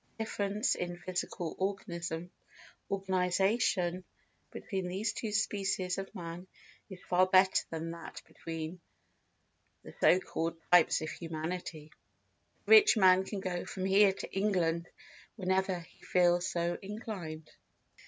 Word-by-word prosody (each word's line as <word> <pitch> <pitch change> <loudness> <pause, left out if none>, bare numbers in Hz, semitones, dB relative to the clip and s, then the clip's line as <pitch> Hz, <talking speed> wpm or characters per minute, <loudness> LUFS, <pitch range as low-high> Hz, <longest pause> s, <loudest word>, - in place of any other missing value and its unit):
The 225 - -1
difference 205 -1 0
in 175 0 -4
physical 175 -2 -4
organisation 175 -3 -3 2.2
between 190 -3 -4
these 195 +4 -2
two 220 - -4
species 195 -3 0
of 195 +2 -7
man 175 0 -7 0.4
is 190 -2 -9
far 185 +1 +3
greater 190 0 +4
than 165 0 -4
that 170 0 -8
between 165 +1 -6 1.0
the - - -11
so 180 - +6
called 165 -2 -3
types 175 -3 +5
of 155 - -4
humanity. 160 -1 -5 0.7
The - - -4
rich 425 - +8
man 190 -1 +6
can 200 0 -5
go 180 -2 -3
from 190 -1 -5
here 195 +1 +5
to 190 - -8
England 175 -4 0 0.5
whenever 190 -2 0
he 165 - -19
feels 175 -1 +3
so 170 0 -1
inclined. 195 -7 -7
180 Hz, 125 wpm, -32 LUFS, 170-195 Hz, 2.2 s, rich